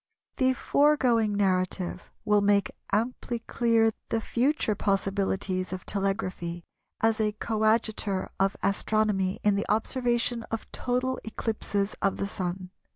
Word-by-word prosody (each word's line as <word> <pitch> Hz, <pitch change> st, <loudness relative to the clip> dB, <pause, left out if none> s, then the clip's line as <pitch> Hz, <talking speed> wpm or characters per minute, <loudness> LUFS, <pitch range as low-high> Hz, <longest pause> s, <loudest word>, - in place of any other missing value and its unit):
The 260 Hz, 0 st, +3 dB
foregoing 255 Hz, -7 st, +3 dB
narrative 185 Hz, -2 st, 0 dB, 0.2 s
will 210 Hz, -1 st, +4 dB
make 200 Hz, 0 st, +3 dB, 0.2 s
amply 235 Hz, +3 st, -1 dB
clear 230 Hz, -1 st, +2 dB, 0.2 s
the 225 Hz, -, +1 dB
future 240 Hz, +1 st, +1 dB
possibilities 195 Hz, -2 st, -1 dB
of 185 Hz, 0 st, -5 dB
telegraphy 190 Hz, -4 st, -2 dB, 0.4 s
as 225 Hz, 0 st, +2 dB
a 210 Hz, -1 st, +1 dB
coadjutor 215 Hz, -2 st, 0 dB
of 195 Hz, 0 st, +2 dB
Astronomy 200 Hz, -1 st, +1 dB
in 210 Hz, -, +4 dB
the 200 Hz, -, -1 dB
observation 240 Hz, +2 st, +1 dB
of 225 Hz, -, -3 dB
total 255 Hz, +1 st, -1 dB
eclipses 215 Hz, -2 st, -2 dB
of 195 Hz, -, +1 dB
the 200 Hz, -, -2 dB
Sun. 185 Hz, -2 st, -4 dB
210 Hz, 120 wpm, -27 LUFS, 195-230 Hz, 0.4 s, will